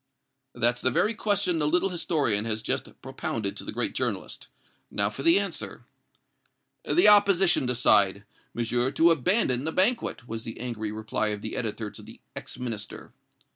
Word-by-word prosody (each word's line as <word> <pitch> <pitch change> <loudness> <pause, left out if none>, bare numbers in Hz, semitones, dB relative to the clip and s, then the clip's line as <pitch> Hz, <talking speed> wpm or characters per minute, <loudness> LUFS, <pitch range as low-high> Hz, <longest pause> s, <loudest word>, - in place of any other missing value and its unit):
"That's 120 +1 +2
the 130 - +3
very 210 - +1
question 200 -5 0
the 150 - +1
little 180 +5 +1
historian 145 - 0
has 110 -1 -2
just - - -3
propounded 100 -4 -4
to - - -7
the - - -6
great - - -2
journalist. - - -4 0.4
Now 100 0 0
for 115 - -8
the 165 +6 +5
answer." 200 -4 -5 1.0
"The 355 - +3
opposition 195 -8 +4
decide, 100 -5 +3 0.3
Monsieur, 120 +2 0
to 165 +5 +4
abandon 150 - +2
the 160 - -2
banquet," 190 - +1
was 115 0 -5
the 115 - -8
angry 115 -4 -4
reply 110 0 -1
of 105 -1 -3
the 110 - -5
editor 110 -2 -4
to - - -11
the - - -14 0.2
ex - - -6
Minister. 115 -5 -6
125 Hz, 165 wpm, -26 LUFS, 110-175 Hz, 1.0 s, the